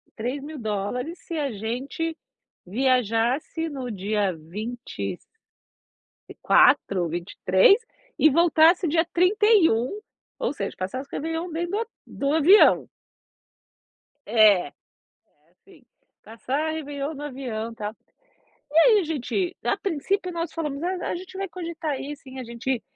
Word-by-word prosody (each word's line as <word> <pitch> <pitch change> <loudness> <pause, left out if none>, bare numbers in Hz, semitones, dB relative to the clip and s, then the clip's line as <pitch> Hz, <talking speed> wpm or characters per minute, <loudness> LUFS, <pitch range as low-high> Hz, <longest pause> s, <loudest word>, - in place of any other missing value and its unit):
$3.000 250 - -4
se - - -7
a 280 -4 -1
gente 255 +10 -4 0.5
viajasse 250 - 0
no 265 -4 -5
dia 205 0 0
20 170 - -6 1.3
quatro, 180 -3 +4
23 185 - +3 0.4
e 310 - +6
voltasse 335 +3 +4
dia 325 +2 +2
31 365 - +3 0.4
ou - - -1
seja, 200 -6 -4
passasse 255 +9 -5
o - - -32
réveillon 325 +3 -3
dentro 340 +2 -3
do 410 - -1
ho 460 - -2 0.2
do 280 +1 -2
avião. 345 +7 +6 1.4
É, 210 -4 +5
é - - -12 0.8
assim, 320 - -22 0.4
passar 265 +8 -3
réveillon 290 -1 -4
no 290 0 -8
avião 240 -5 -5
tal. 215 0 -5 0.8
E 305 - -5
aí 430 +5 +7
a 365 - -2
gente, 325 +5 -2
a - - +1
princípio 370 +1 -2
nós 335 -1 -3
falamos 300 -4 -4
não, 360 +2 -2
não - - -5
a - - -1
gente 370 +2 -8
vai 390 -1 -3
cogitar 330 -5 -4
ir 290 +1 -6
sim, 265 -1 -12
a 255 - -6
gente 235 +1 -3
280 Hz, 130 wpm, -25 LUFS, 225-335 Hz, 1.4 s, aí